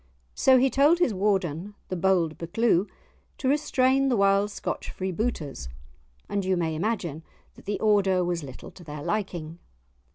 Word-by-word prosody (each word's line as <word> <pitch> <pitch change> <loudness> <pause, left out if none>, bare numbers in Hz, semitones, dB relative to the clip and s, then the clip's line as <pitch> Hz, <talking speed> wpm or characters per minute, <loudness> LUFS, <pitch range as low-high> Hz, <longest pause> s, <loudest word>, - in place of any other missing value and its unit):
So 260 -1 +5
he 260 +1 +3
told 290 +7 +4
his 345 -10 +2
Warden, 190 -1 -1
the 185 - -2
bold 175 -3 +1
Buccleuch, 185 +2 +1 0.5
to 260 - -3
restrain 270 -1 +2
the 245 - +2
wild 200 +1 +3
Scotch - - -5
freebooters; 185 - -3 0.6
and 200 -1 -2
you 185 0 +1
may 165 -2 -1
imagine 170 -3 -2 0.3
that - - -17
the 205 - -2
order 195 -4 +3
was 175 -1 -1
little 135 -3 -10
to 180 - -14
their 150 -2 -7
liking. 175 -6 -3
195 Hz, 155 wpm, -26 LUFS, 170-225 Hz, 0.6 s, So